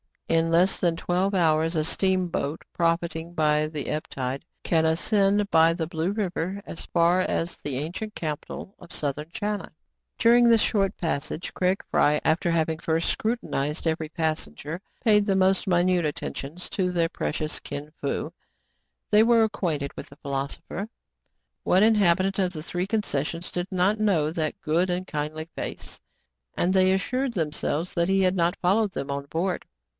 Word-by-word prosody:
In 165 0 +2
less 175 +3 +3
than 170 -2 +2
twelve 185 +3 0
hours 165 -1 +2
a 155 - +2
steamboat, 180 -3 0
profiting 170 0 -1
by 155 -2 +2
the 155 -2 -5
ebb 155 - -2
tide, 135 +3 -4 0.2
can 160 -2 +2
ascend 200 +5 +2
by 165 0 +6
the 165 -1 -2
Blue 165 +3 -2
River 195 -1 -2
as 165 - -7
far 170 +1 +3
as 175 -2 -1
the 140 -3 -4
ancient 180 +9 -5
capital 155 +4 -5
of 175 - -12
Southern 150 +1 -3
China. 205 +2 -3 0.5
During 240 +1 +5
this 230 -2 +5
short 195 -2 +1
passage, 160 0 -3
Craig 185 +1 0
Fry, 150 0 +4
after 165 +3 +2
hav 165 -1 +2
ing 160 -1 -3
first 165 0 0
scrutinized 160 - -2
every 160 -1 0
passenger, 155 - -3 0.2
paid 210 -2 +5
the 195 -2 +2
most 190 +1 +3
minute 175 -1 +3
attentions 150 +2 -5
to 185 -2 0
their 170 -2 +1
precious 150 - -3
Kin 145 +1 -7
Fo. 150 +3 -2 0.8
They 210 0 +7
were 230 0 +5
acquainted 160 -10 -1
with - - -7
the 140 - -14
philosopher, 140 +8 -4 0.4
— - - -51
what 190 +3 +4
in 225 +1 +6
habitant 195 -1 +3
of 185 -1 +1
the 155 -2 -6
three 180 +2 -3
concessions 170 -6 -2
did 175 0 -2
not 190 +3 +2
know 175 -8 +2
that 160 -2 -2
good 170 +4 +1
and 180 +1 -1
kindly 155 0 -4
face.^ - - -6 0.3
— - - -58
and 180 +2 +2
they 185 -1 +4
assured 250 +7 -1
themselves 160 0 -2
that 170 0 +1
he 195 0 +3
had 185 0 +3
not 175 +1 +2
followed 195 +2 +2
them 140 +1 -4
on 140 0 -3
board. 170 +5 -2
170 Hz, 170 wpm, -26 LUFS, 155-190 Hz, 0.8 s, They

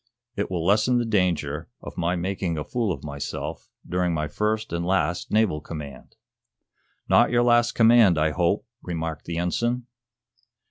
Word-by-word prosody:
"It - - -2
will 85 -3 -2
lessen 110 +6 +3
the 120 - +1
danger 90 -9 0
of - - -9
my 85 +1 0
making 90 -1 -2
a 75 - -2
fool 115 0 -1
of - - -5
myself 70 -1 -5 0.2
during 90 -1 0
my 75 -1 -1
first 105 +5 -2
and 85 0 -1
last 90 -1 0
naval 105 -8 +2
command." 75 -4 -9 0.9
"Not - - +5
your 120 0 +3
last 120 0 +4
command, 115 -6 +6
I 75 0 +2
hope," 90 +4 0 0.2
remarked 80 -3 -4
the 85 -1 -4
ensign. 120 +8 -1
90 Hz, 155 wpm, -25 LUFS, 80-110 Hz, 0.9 s, command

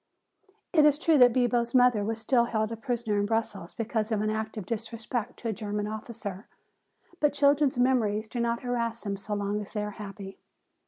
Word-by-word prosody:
It 310 -3 +6
is 295 -1 +5
true 315 -1 +3
that 245 -1 +8
Bibo's 240 0 +1
mother 245 -4 +5
was 220 +2 -2
still 235 +1 +2
held 220 -2 -1
a - - -2
prisoner 225 -3 -1
in 205 - 0
Brussels 220 -5 -2
because 225 -1 -2
of 215 - +1
an 215 0 0
act 220 0 -3
of 205 - -5
disrespect 230 +2 -4
to 230 - -4
a - - -1
German 210 0 -3
officer. 215 -2 -6 0.7
But 295 -1 +2
children's 285 -2 +3
memories 230 -4 +2
do 240 - -5
not 235 0 0
harass 235 -2 -2
them 200 -2 -2
so 205 +2 -4
long 205 +1 -1
as 205 - -9
they 210 -2 -1
are 210 - -4
happy. 195 -1 -9
225 Hz, 200 wpm, -28 LUFS, 210-245 Hz, 0.7 s, that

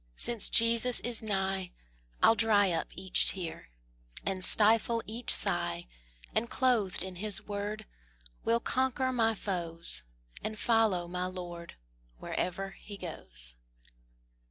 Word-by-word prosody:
Since 235 -4 0
Jesus 230 +1 +4
is 240 -2 -1
nigh, 195 -3 -1 0.5
I'll - - +8
dry 210 -4 +3
up 165 - -1
each 185 +1 +2
tear, 170 - 0 0.6
And 190 -1 -1
stifle 225 +3 +4
each 225 +3 -4
sigh: 85 0 +2 0.5
And 235 - 0
clothed 235 -9 +1
in 185 -1 -6
His 210 +1 +1
word 205 +1 -4 0.6
Will 230 +1 +3
conquer 260 +1 0
my 225 -2 +2
foes, 170 - -3 0.4
And 215 0 -3
follow 215 -7 +2
my 180 +1 -2
Lord 175 -2 -7 0.4
Wherever 195 - -3
He 200 +1 -10
goes. - - -5
200 Hz, 120 wpm, -31 LUFS, 180-225 Hz, 0.6 s, I'll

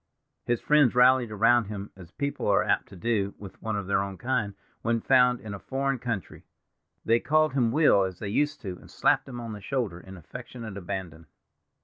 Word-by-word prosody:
His 120 -1 0
friends 150 -5 +4
rallied 125 -1 +5
around 115 +3 +3
him 100 0 -7
as 90 -3 -13
people 140 +10 -3
are 100 -1 +4
apt - - 0
to - - -12
do 100 0 -1
with 100 -2 -11
one 110 -1 -2
of 100 -2 -3
their 95 0 +1
own 100 -1 -5
kind 115 -4 -1 0.3
when 115 0 +1
found 125 0 +4
in 105 -2 -8
a 100 - -6
foreign 135 +3 -2
country. 115 -7 -5 0.6
They 115 +1 +4
called 155 +1 +2
him 120 -4 +2
Will, 145 -7 +5
as 95 -1 -6
they 100 - -5
used 145 +8 0
to, 95 -5 -6
and - - -16
slapped - - +2
him 125 -2 -7
on 115 -2 -6
the 105 - -8
shoulder 110 -6 -2
in 95 +1 -11
affectionate 115 +4 -9
abandon. 90 -4 -6
110 Hz, 205 wpm, -27 LUFS, 100-125 Hz, 0.6 s, rallied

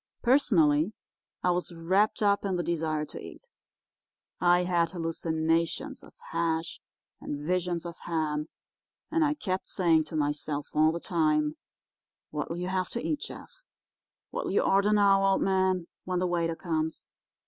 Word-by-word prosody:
Personally, 185 - +4 0.5
I 180 - +3
was 180 0 -1
wrapped 190 +6 +2
up 200 0 +3
in 195 -2 0
the 175 - -1
desire 160 -3 -1
to - - -9
eat. - - -11 0.9
I 175 0 +4
had 175 -2 +2
hallucinations 165 -1 -1
of - - -16 0.2
hash 165 0 -1 0.4
and 145 0 -5
visions 175 0 -1
of 170 -1 -7
ham, 155 -2 -1 0.6
and 325 0 +3
I 300 0 +2
kept 190 -9 -3
saying 165 -4 +3
to 155 - -7
myself 145 -1 -2
all 155 +1 +4
the 170 - -3
time, 155 -3 +1 0.8
'What'll 150 +3 -3
you 180 +1 -3
have 185 -1 -1
to 235 - -3
eat, 300 - 0
Jeff?—what'll - - -9
you - - +3
order 200 +2 +3
now, 200 -2 +5
old 195 0 +3
man, 190 -2 +2 0.2
when 185 0 -1
the 180 - +1
waiter 170 -2 0
comes? 160 -2 -3
170 Hz, 150 wpm, -28 LUFS, 160-190 Hz, 0.9 s, now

